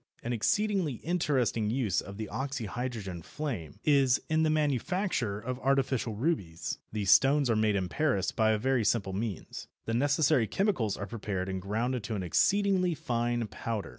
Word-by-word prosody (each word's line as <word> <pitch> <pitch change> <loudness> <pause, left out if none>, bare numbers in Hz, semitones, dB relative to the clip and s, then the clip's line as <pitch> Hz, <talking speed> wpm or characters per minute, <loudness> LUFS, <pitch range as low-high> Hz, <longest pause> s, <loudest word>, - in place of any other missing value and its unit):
An 120 - -2
exceedingly 190 - +1
interesting 135 -10 +1
use 115 -5 0
of 100 0 -9
the 110 -1 -4
oxyhydrogen 120 -7 -4
flame 110 - -5
is 140 -4 +4
in 160 0 +3
the 160 - +3
manufacture 150 - 0
of 125 +3 -4
artificial 130 -4 +1
rubies. 105 - -2
These 105 -3 +1
stones 135 +5 +5
are - - +2
made 110 -1 +2
in 95 -2 0
Paris 100 - 0
by 110 -1 +2
a 110 - +3
very 130 +1 +1
simple 100 -3 +1
means. 100 -2 -5 0.2
The 115 - -2
necessary 145 -1 +3
chemicals 120 - 0
are 100 - -4
prepared 100 -3 -4
and 95 -1 -3
ground 115 +6 -1
to 110 +1 -4
an 95 - -3
exceedingly 190 - +2
fine 120 -6 -1
powder. 110 0 -4
120 Hz, 165 wpm, -30 LUFS, 105-145 Hz, 0.2 s, stones